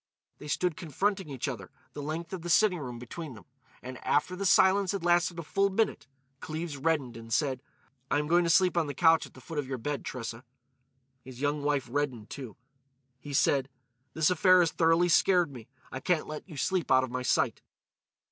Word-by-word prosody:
They 150 - -9
stood 175 +2 0
confronting 190 +3 -2
each 135 0 -4
other, 110 -9 -6 0.2
the 145 - -6
length 160 +4 -5
of 185 - -4
the 175 - -6
sitting 185 -1 +4
room 125 -4 -6
between 130 +4 -8
them. 105 - -14 0.4
And 130 +1 -7
after 150 +5 +1
the 195 +1 -1
silence 190 +1 +4
had 190 -4 -4
lasted 175 0 +2
a 170 - -4
full 195 +6 +1
minute 190 -8 -1 0.3
Cleves 160 0 -5
reddened 140 -4 -1
and 115 0 -10
said: 135 -1 0 0.5
"I - - +2
am 150 - 0
going 175 +3 +3
to 170 - 0
sleep 180 +3 +4
on 165 -3 +2
the 145 - -5
couch 165 +1 +4
at - - -22
the 130 - -13
foot 150 +4 -5
of 140 - -3
your 130 -1 -3
bed, 145 +4 -4
Tressa." 115 -1 -6 0.8
His 130 -1 -11
young 145 +1 0
wife 145 -2 0
reddened 125 -4 -3
too. 130 -6 -8 0.6
He 145 - -9
said: 135 -2 +2 0.5
"This 160 +2 +3
affair 185 +1 +5
has 170 - +2
thoroughly 165 +1 +3
scared 175 -2 +3
me. 120 -4 -11 0.2
I 130 - -5
can't 175 +2 0
let 155 +5 -8
you 155 - -9
sleep 185 +3 -1
out 130 0 +5
of 130 - -4
my 130 0 -3
sight." 125 - +1
150 Hz, 205 wpm, -29 LUFS, 130-175 Hz, 0.8 s, affair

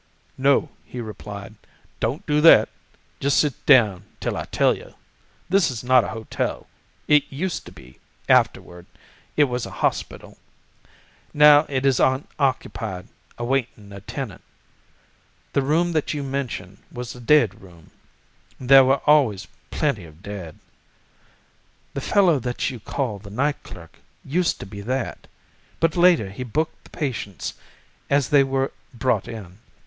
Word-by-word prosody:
"'No,' 140 +3 +2
he 125 - -9
replied, 105 -2 -8 0.5
'don't - - -2
do 150 0 +2
that; 165 - +7 0.5
just 140 0 +1
sit 145 -4 0
down 110 -10 +5 0.2
till - - -2
I - - -4
tell - - +2
you. - - -13 0.5
This 185 -2 +3
is 125 -3 -5
not 125 -1 +5
a - - -4
hotel. 110 0 -4 0.4
It 150 -1 +5
used 170 +6 -4
to - - -10
be; 65 0 -16 0.3
afterward 90 0 +1 0.5
it 150 - +6
was 125 -3 -2
a - - -10
hospital. - - -3 1.0
Now 150 0 +7
it 135 -1 -1
is 135 -2 +3
unoccupied, 130 -7 -1 0.3
awaiting 120 -4 -2
a 100 0 -9
tenant. 120 0 -6 1.1
The 140 - +2
room 160 +6 +1
that 155 -2 -1
you 145 - -3
mention 135 -4 -5
was 120 0 -6
the 125 - -12
dead 120 -6 +3
room—there 110 - 0
were 135 +1 +2
always 115 -11 +3 0.2
plenty 140 - -1
of 80 +3 -17
dead. 95 -6 -8 1.4
The - - -4
fellow 180 -8 +3
that 125 +2 -2
you 125 - -8
call 115 -1 -3
the 100 +1 -12
night 140 +8 -1
clerk 85 -2 -13 0.3
used 170 +5 0
to - - -6
be 100 +1 -9
that, 125 +4 -4 0.5
but 165 -1 +1
later 170 - +4
he 105 - -8
booked 150 +7 -3
the - - -16
patients 110 - -4 0.6
as 140 -2 +2
they 145 -2 +5
were 135 0 -1 0.2
brought 120 -4 0
in. 105 -5 -9
130 Hz, 145 wpm, -23 LUFS, 105-145 Hz, 1.4 s, that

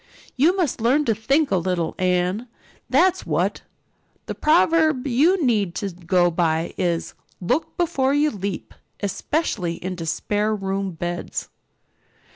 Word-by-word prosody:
"You 325 +9 +3
must 320 -10 -1
learn 270 +6 +3
to 225 - +2
think 270 +7 +1
a - - +3
little, 175 -1 -1
Anne, 185 +5 0 0.4
that's 375 0 +3
what. - - -1 0.6
The - - -4
proverb 315 -3 +3
you 300 +7 +3
need 205 -8 +1
to 200 -2 -3
go 175 0 +1
by 165 -1 0
is 170 -2 -1 0.3
'Look 250 - -1
before 275 -7 +1
you 300 +1 +3
leap' 200 -2 -5 0.3
especially 200 - -1
into 180 -3 -4
spare 210 +6 0
room 195 -1 -2
beds." 175 +2 -4
205 Hz, 130 wpm, -22 LUFS, 180-290 Hz, 0.6 s, You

